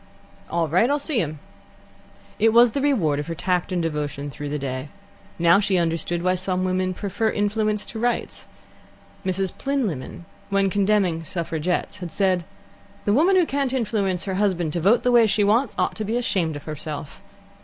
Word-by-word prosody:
"All 170 Hz, -1 st, 0 dB
right; 185 Hz, -, +3 dB
I'll 290 Hz, -, +2 dB
see 285 Hz, -3 st, -1 dB
him." 155 Hz, -4 st, -2 dB, 1.0 s
It 220 Hz, +1 st, +4 dB
was 235 Hz, 0 st, +7 dB
the 275 Hz, -, -2 dB
reward 190 Hz, -, +2 dB
of 145 Hz, -, -4 dB
her 165 Hz, -, -4 dB
tact 180 Hz, +1 st, -1 dB
and 175 Hz, -2 st, 0 dB
devotion 145 Hz, -2 st, -3 dB
through 145 Hz, +1 st, -6 dB
the 150 Hz, -, -2 dB
day. 135 Hz, 0 st, -4 dB, 0.5 s
Now 170 Hz, +3 st, +5 dB
she 200 Hz, -2 st, +1 dB
understood 170 Hz, 0 st, 0 dB
why 185 Hz, 0 st, +3 dB
some 185 Hz, 0 st, -1 dB
women 185 Hz, 0 st, 0 dB
prefer 210 Hz, +4 st, -1 dB
influence 210 Hz, 0 st, 0 dB
to 225 Hz, -, -7 dB
rights. 240 Hz, +1 st, -2 dB, 0.8 s
Mrs. 190 Hz, -1 st, -1 dB
Plynlimmon, 215 Hz, -, -3 dB, 0.2 s
when 195 Hz, -1 st, +2 dB
condemning 195 Hz, -5 st, +1 dB
suffragettes, 170 Hz, +2 st, -2 dB
had 175 Hz, -4 st, -7 dB
said: 185 Hz, -4 st, +1 dB, 0.6 s
"The 205 Hz, -, +3 dB
woman 340 Hz, -, +4 dB
who 365 Hz, -2 st, +5 dB
can't 275 Hz, -3 st, -1 dB
influence 205 Hz, -7 st, 0 dB
her 195 Hz, -1 st, -3 dB
husband 175 Hz, -6 st, 0 dB
to 170 Hz, -, -1 dB
vote 205 Hz, +8 st, +4 dB
the 250 Hz, -, +3 dB
way 235 Hz, -2 st, +6 dB
she 210 Hz, 0 st, +2 dB
wants 220 Hz, +3 st, +2 dB
ought -, -, 0 dB
to 215 Hz, -, -2 dB
be 220 Hz, +3 st, -1 dB
ashamed 180 Hz, -10 st, 0 dB
of 145 Hz, -, -7 dB
herself." 150 Hz, -1 st, -6 dB
185 Hz, 180 wpm, -23 LUFS, 165-220 Hz, 1.0 s, was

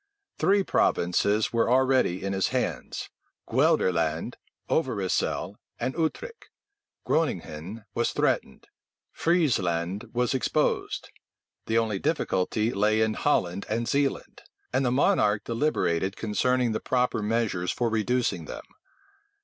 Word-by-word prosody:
Three 200 Hz, +1 st, +3 dB
provinces 100 Hz, -, +1 dB
were 115 Hz, 0 st, +2 dB
already 130 Hz, -8 st, +2 dB
in 100 Hz, 0 st, -2 dB
his 95 Hz, 0 st, +1 dB
hands, -, -, -3 dB, 0.4 s
Guelderland, 80 Hz, -3 st, +1 dB, 0.3 s
Overyssel, 110 Hz, -, -1 dB, 0.2 s
and 130 Hz, +2 st, -1 dB
Utrecht; 315 Hz, -, -3 dB, 0.6 s
Groninghen 100 Hz, -, -2 dB
was 120 Hz, -, +1 dB
threatened; -, -, -1 dB, 0.5 s
Friezeland 105 Hz, -, 0 dB
was 125 Hz, +2 st, 0 dB
exposed: 130 Hz, -, -1 dB, 0.6 s
the 115 Hz, -, +1 dB
only 110 Hz, -4 st, 0 dB
difficulty 110 Hz, -, 0 dB
lay 105 Hz, +2 st, +2 dB
in 110 Hz, 0 st, +2 dB
Holland 95 Hz, -10 st, 0 dB
and 115 Hz, +2 st, -1 dB
Zealand; 140 Hz, -1 st, -1 dB, 0.3 s
and 130 Hz, +2 st, +2 dB
the 125 Hz, -, +2 dB
monarch 105 Hz, -5 st, +2 dB
deliberated 100 Hz, -, 0 dB
concerning 125 Hz, +3 st, +1 dB
the 110 Hz, -, -1 dB
proper 125 Hz, -3 st, 0 dB
measures 105 Hz, -5 st, 0 dB
for 120 Hz, -, -1 dB
reducing 115 Hz, +3 st, 0 dB
them. -, -, -8 dB
115 Hz, 110 wpm, -27 LUFS, 100-130 Hz, 0.6 s, Three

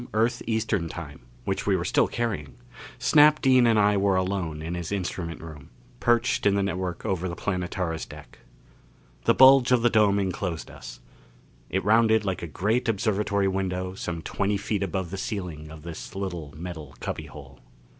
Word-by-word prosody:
Earth 120 Hz, +2 st, +1 dB
Eastern 110 Hz, -6 st, 0 dB
time, 80 Hz, -4 st, -8 dB, 0.3 s
which -, -, -2 dB
we -, -, +4 dB
were -, -, -2 dB
still -, -, +3 dB
carrying, 105 Hz, -, -3 dB, 0.4 s
Snap 150 Hz, +4 st, +5 dB
Dean 130 Hz, -3 st, +5 dB
and 115 Hz, -1 st, +4 dB
I 105 Hz, 0 st, +4 dB
were 100 Hz, -1 st, +2 dB
alone 90 Hz, -5 st, -2 dB
in 85 Hz, +2 st, -4 dB
his 85 Hz, -1 st, -4 dB
instrument 90 Hz, -4 st, -3 dB
room, 75 Hz, -4 st, -10 dB, 0.3 s
perched 120 Hz, -2 st, +2 dB
in 100 Hz, -, +3 dB
the 100 Hz, -, +1 dB
network 95 Hz, -2 st, -3 dB
over 95 Hz, -1 st, -1 dB
the 85 Hz, -, -5 dB
Planetara's 90 Hz, -4 st, -3 dB
deck. -, -, -13 dB, 0.9 s
The -, -, +4 dB
bulge 130 Hz, -1 st, +7 dB
of 125 Hz, -2 st, +4 dB
the 120 Hz, -, +4 dB
dome 105 Hz, -2 st, +4 dB
enclosed 95 Hz, -3 st, -3 dB
us; -, -, -11 dB, 0.7 s
it 95 Hz, -1 st, -1 dB
rounded 110 Hz, 0 st, +4 dB
like 95 Hz, -3 st, -2 dB
a 85 Hz, -, -4 dB
great 110 Hz, -, 0 dB
observatory 100 Hz, -2 st, +1 dB
window 95 Hz, -1 st, -2 dB
some 85 Hz, -3 st, -5 dB
twenty 100 Hz, +1 st, -1 dB
feet 100 Hz, 0 st, -2 dB
above 95 Hz, -2 st, -2 dB
the 100 Hz, -, -4 dB
ceiling 90 Hz, -8 st, -5 dB
of 80 Hz, -1 st, -11 dB
this 85 Hz, +2 st, -8 dB
little 90 Hz, -6 st, -4 dB
metal 80 Hz, -5 st, -7 dB
cubbyhole. 70 Hz, -3 st, -7 dB
95 Hz, 170 wpm, -26 LUFS, 85-110 Hz, 0.9 s, bulge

